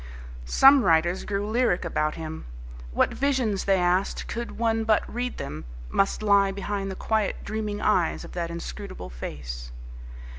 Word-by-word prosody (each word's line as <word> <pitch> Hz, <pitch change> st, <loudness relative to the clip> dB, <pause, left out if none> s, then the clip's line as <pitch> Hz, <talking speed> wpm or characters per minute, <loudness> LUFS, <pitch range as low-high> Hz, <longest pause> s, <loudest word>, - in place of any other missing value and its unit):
Some 270 Hz, -, +7 dB
writers 175 Hz, +1 st, +2 dB
grew 205 Hz, 0 st, -2 dB
lyric 220 Hz, -6 st, +1 dB
about 155 Hz, -2 st, 0 dB
him. 160 Hz, -1 st, -6 dB, 0.5 s
What -, -, +2 dB
visions, 255 Hz, -8 st, 0 dB
they 195 Hz, -1 st, +4 dB
asked, 180 Hz, +2 st, +1 dB
could 235 Hz, 0 st, -5 dB
one 225 Hz, -1 st, +1 dB
but 220 Hz, -1 st, +3 dB
read 245 Hz, +1 st, -3 dB
them, 75 Hz, +1 st, -6 dB, 0.3 s
must 195 Hz, +2 st, +1 dB
lie 200 Hz, -1 st, +5 dB
behind 195 Hz, 0 st, -3 dB
the 190 Hz, -, -5 dB
quiet, 215 Hz, -1 st, -1 dB
dreaming 210 Hz, -1 st, -3 dB
eyes 185 Hz, -6 st, +1 dB
of -, -, -11 dB
that 170 Hz, -1 st, -3 dB
inscrutable 170 Hz, -, -7 dB
face? -, -, -7 dB
195 Hz, 150 wpm, -26 LUFS, 170-220 Hz, 0.5 s, Some